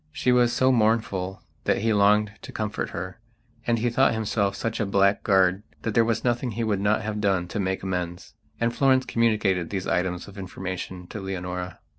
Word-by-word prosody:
She 125 - +1
was 120 -1 +4
so 130 +1 +3
mournful 110 -5 +1 0.2
that - - +2
he 115 -1 +3
longed 105 +1 +4
to - - -9
comfort 105 -1 -3
her, 90 +4 -6 0.5
and 120 -1 +3
he 120 +1 0
thought 130 -1 +3
himself 100 -2 0
such 115 +3 -3
a 110 - +1
blackguard 100 -1 +3 0.2
that 110 - -1
there 115 - +5
was 115 0 0
nothing 120 -1 0
he 115 +3 -2
would 105 -3 0
not 105 +1 +2
have 105 0 -3
done 95 -4 +1
to 105 - -3
make 95 -1 -1
amends. 90 -2 -4 0.3
And 115 0 0
Florence 130 -1 +3
communicated 105 -7 +1
these 95 -2 -3
items 90 -1 -1
of 100 0 -10
information 95 -1 -6
to 105 - -6
Leonora. 90 -2 -5
100 Hz, 190 wpm, -25 LUFS, 95-115 Hz, 0.5 s, there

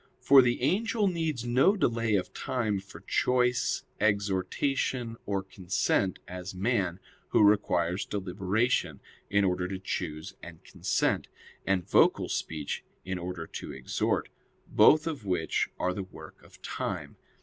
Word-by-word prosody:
For 140 -1 +7
the 120 0 0
angel 210 - +2
needs 160 -9 -1
no 135 - +4
delay 115 - +1
of 95 - -1
time 110 -6 -1
for 95 -3 -13
choice, 125 +4 +1 0.2
exhortation, 110 +5 0
or 100 -1 -1
consent, 95 0 0
as 90 +1 -7
man, 95 -3 0 0.3
who - - +4
requires 100 -3 +3
deliberation 100 +4 0 0.3
in 100 0 +3
order 90 -1 +1
to 95 +1 -4
choose 80 -4 -4
and - - -11
consent, - - 0 0.4
and 95 -3 +1
vocal - - +4
speech 75 -3 -3 0.2
in 95 -1 -3
order 90 -1 -5
to - - -7
exhort; 65 -1 -1 0.4
both 155 +1 +5
of 155 -8 -4
which 90 -4 0
are 90 - 0
the 100 - -4
work 95 - -12
of - - -18
time. - - -4
100 Hz, 135 wpm, -29 LUFS, 90-125 Hz, 0.4 s, For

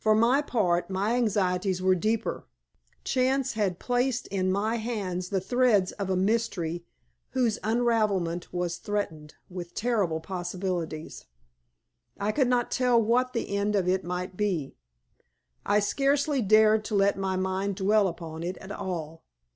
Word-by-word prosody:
For 215 0 +4
my 240 +6 +4
part, 185 -12 0
my 195 +4 0
anxieties 190 -5 +1
were 185 0 +3
deeper. 215 +5 -1 0.6
Chance 265 +1 +1
had 200 -5 0
placed 245 +1 0
in 185 -1 0
my 215 +4 0
hands 195 -6 -3
the 195 - 0
threads 210 -1 +2
of 200 -2 -5
a 190 - +1
mystery 185 -4 0 0.5
whose 240 -4 +1
unravelment 215 -7 0
was 175 -1 -2
threatened 160 -8 -4
with 175 -2 -8
terrible 210 -9 0
possibilities. 175 -2 -4 0.9
I 205 +1 0
could 265 +1 +2
not 245 -1 +1
tell 250 -2 +3
what 245 +3 +2
the 230 -4 -2
end 205 +1 0
of 190 -3 +1
it 185 +1 +1
might 180 +1 -4
be. 180 -9 -1 0.9
I 205 +1 +4
scarcely 275 +5 +1
dared 215 +1 +5
to 215 - -2
let 200 0 +3
my 190 -1 -2
mind 190 +1 -1
dwell 205 +1 +3
upon 165 -2 -6
it 180 +2 -4
at 190 - -10
all. 165 -5 -5
200 Hz, 145 wpm, -27 LUFS, 180-230 Hz, 0.9 s, dared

